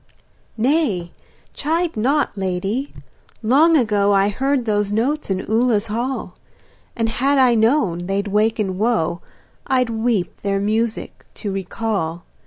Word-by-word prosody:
Nay, 220 Hz, -, +1 dB, 0.4 s
chide 330 Hz, +3 st, -1 dB
not, 270 Hz, +6 st, +1 dB
lady; 195 Hz, +7 st, -2 dB, 0.5 s
long 305 Hz, +8 st, +5 dB
ago 205 Hz, -5 st, +2 dB
I 195 Hz, +1 st, +3 dB
heard 265 Hz, +4 st, 0 dB
those 205 Hz, -2 st, 0 dB
notes 255 Hz, +8 st, -1 dB
in 190 Hz, -1 st, -2 dB
Ula's 225 Hz, -1 st, +1 dB
hall, 250 Hz, +4 st, -3 dB, 0.6 s
And 225 Hz, -1 st, 0 dB
had 275 Hz, +5 st, +1 dB
I 255 Hz, -2 st, +5 dB
known 220 Hz, -, +1 dB
they'd 200 Hz, +1 st, -1 dB
waken 210 Hz, -2 st, 0 dB
woe 215 Hz, -6 st, 0 dB, 0.5 s
I'd 255 Hz, -3 st, +1 dB
weep 220 Hz, -5 st, -1 dB
their 200 Hz, -1 st, 0 dB
music 220 Hz, +3 st, -2 dB
to 205 Hz, -, -4 dB
recall. 190 Hz, -3 st, -3 dB
220 Hz, 125 wpm, -20 LUFS, 200-255 Hz, 0.6 s, long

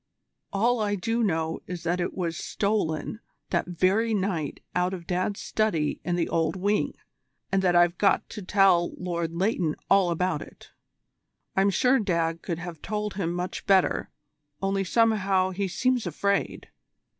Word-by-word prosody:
All 235 Hz, +4 st, +2 dB
I 205 Hz, -1 st, 0 dB
do 225 Hz, +5 st, -1 dB
know 160 Hz, -6 st, 0 dB
is 180 Hz, -1 st, -6 dB
that 175 Hz, +2 st, 0 dB
it 175 Hz, -, -3 dB
was 170 Hz, -3 st, -1 dB
stolen 200 Hz, -1 st, -1 dB, 0.3 s
that 170 Hz, -, +1 dB
very 190 Hz, +6 st, +2 dB
night 185 Hz, -7 st, -2 dB
out 180 Hz, +1 st, +1 dB
of 170 Hz, -2 st, -10 dB
Dad's 185 Hz, +3 st, -1 dB
study 170 Hz, -9 st, 0 dB
in 175 Hz, -, -1 dB
the 170 Hz, -1 st, 0 dB
Old 165 Hz, +1 st, 0 dB
Wing, 200 Hz, +3 st, 0 dB, 0.6 s
and 195 Hz, -, +2 dB
that 180 Hz, -2 st, +2 dB
I've 175 Hz, 0 st, +4 dB
got 200 Hz, -, +3 dB
to 210 Hz, -, -6 dB
tell 185 Hz, -2 st, +3 dB
Lord 170 Hz, -2 st, -3 dB
Leighton 180 Hz, -4 st, 0 dB, 0.2 s
all 195 Hz, -2 st, +5 dB
about 170 Hz, -2 st, 0 dB
it. -, -, -13 dB, 0.8 s
I'm 195 Hz, +1 st, +4 dB
sure 250 Hz, +7 st, +3 dB
Dad 165 Hz, -5 st, 0 dB
could 170 Hz, -4 st, -3 dB
have 170 Hz, -2 st, -7 dB
told 210 Hz, -1 st, -3 dB
him 180 Hz, -4 st, -2 dB
much 180 Hz, +3 st, -4 dB
better, 190 Hz, -2 st, +3 dB, 0.5 s
only 195 Hz, 0 st, 0 dB
somehow 195 Hz, -3 st, +2 dB
he 195 Hz, +1 st, -2 dB
seems 250 Hz, +3 st, 0 dB
afraid." 200 Hz, +5 st, -1 dB
185 Hz, 155 wpm, -26 LUFS, 170-205 Hz, 0.8 s, all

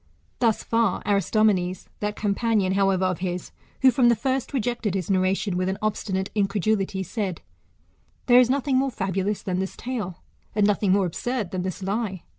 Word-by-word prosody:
Thus 225 Hz, -3 st, +2 dB
far 230 Hz, -4 st, +1 dB
Aris 200 Hz, -3 st, +1 dB
tomenes. 190 Hz, -5 st, +2 dB
That 210 Hz, 0 st, -2 dB
companion, 205 Hz, -2 st, +1 dB
however, 195 Hz, -1 st, +2 dB
of 185 Hz, -2 st, -1 dB
his, 180 Hz, -1 st, -4 dB, 0.3 s
who 260 Hz, -, +8 dB
from 240 Hz, 0 st, +4 dB
the 235 Hz, -, +4 dB
first 260 Hz, +3 st, -1 dB
rejected 240 Hz, -5 st, -1 dB
his 190 Hz, 0 st, -2 dB
narration 185 Hz, +1 st, +1 dB
with 185 Hz, +1 st, 0 dB
an 190 Hz, -, -2 dB
obstinate 200 Hz, -2 st, -2 dB
incredulity, 200 Hz, -1 st, 0 dB
said, 190 Hz, -2 st, -3 dB, 0.8 s
There 245 Hz, -1 st, +7 dB
is 250 Hz, -1 st, +4 dB
no 275 Hz, +2 st, +2 dB
thing 265 Hz, -1 st, +1 dB
more 270 Hz, +1 st, +2 dB
fabulous 195 Hz, -2 st, -2 dB
than 185 Hz, -1 st, -1 dB
this 190 Hz, 0 st, -4 dB
tale, 210 Hz, -9 st, -5 dB, 0.3 s
and 210 Hz, -1 st, +3 dB
nothing 205 Hz, -1 st, +2 dB
more 195 Hz, 0 st, +3 dB
absurd 215 Hz, +3 st, -3 dB
than 185 Hz, -, -2 dB
this 185 Hz, +1 st, -4 dB
lie. 195 Hz, -2 st, -2 dB
200 Hz, 180 wpm, -25 LUFS, 190-230 Hz, 0.8 s, who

